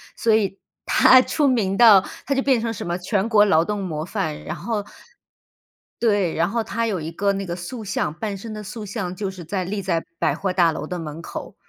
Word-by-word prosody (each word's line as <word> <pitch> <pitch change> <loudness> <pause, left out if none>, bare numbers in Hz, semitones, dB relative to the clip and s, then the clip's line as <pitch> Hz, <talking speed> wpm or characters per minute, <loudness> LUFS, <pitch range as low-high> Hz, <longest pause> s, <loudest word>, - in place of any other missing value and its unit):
所 225 - +2
以 195 -3 0 0.3
他 255 - +7
出 295 -3 +1
名 210 -7 +1
到， 220 -5 +8 0.3
他 275 - +1
就 270 - +1
变 260 -4 +3
成 230 0 -1
什 225 - -6
么 175 +1 -2
全 195 +3 0
国 215 -3 +5
劳 165 -4 +3
动 210 0 -3
模 155 -4 -4
范， 180 -6 -3
然 - - -5
后 215 -3 -3 1.1
对， 205 -7 +1
然 170 +2 +2
后 230 +1 -1
他 230 +1 -2
有 190 -7 -2
一 160 - -5
个 200 +4 0
那 195 0 -3
个 175 - -4
塑 200 +7 -7
像， 190 -6 -2
半 200 +3 -4
身 220 +3 -8
的 215 - -6
塑 210 +2 -7
像 190 -3 -4
就 195 0 -3
是 185 -2 -10
在 185 +3 -3
立 200 +3 -3
在 170 -3 -1
百 - - +1
货 190 -2 -2
大 175 -3 +4
楼 155 - -5
的 180 +1 -4
门 160 0 -7
口， - - -7
195 Hz, 245 characters per minute, -22 LUFS, 175-220 Hz, 1.1 s, 到